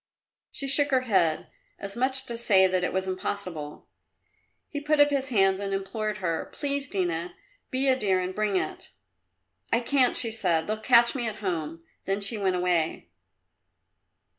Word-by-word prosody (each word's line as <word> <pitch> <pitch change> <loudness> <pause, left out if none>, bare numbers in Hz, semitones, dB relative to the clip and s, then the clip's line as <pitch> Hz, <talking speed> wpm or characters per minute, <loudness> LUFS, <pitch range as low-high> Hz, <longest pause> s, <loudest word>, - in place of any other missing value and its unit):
She 275 - -2
shook 285 +1 +4
her 260 -2 +2
head, 190 -10 +1 0.3
as 200 0 -5
much 260 +2 +2
as - - -13
to 235 - -4
say 195 -5 +5
that 185 -1 +1
it - - 0
was 190 0 -2
impossible. 185 -5 -5 0.8
He 290 - -5
put 300 +1 +1
up 290 0 +5
his 270 -1 -1
hands 195 -5 +3
and 195 -1 -2
implored 210 +2 -3
her, 170 -5 -3
"Please, 280 -1 +1
Dina! 175 -2 -2 0.3
Be 265 +1 -1
a 260 - +4
dear 195 -7 +1
and 185 0 -3
bring 210 0 -1
it!" 185 - -3 0.8
"I - - +3
can't," 255 +1 +2
she 230 - +2
said; 170 -7 0
"they'll 215 +1 -2
catch 235 +1 +4
me 245 -4 -1
at 215 - -4
home." 165 -5 -4 0.2
Then 195 +1 0
she 200 +3 +1
went 195 -3 0
away. 175 - -1
200 Hz, 175 wpm, -26 LUFS, 185-255 Hz, 0.8 s, say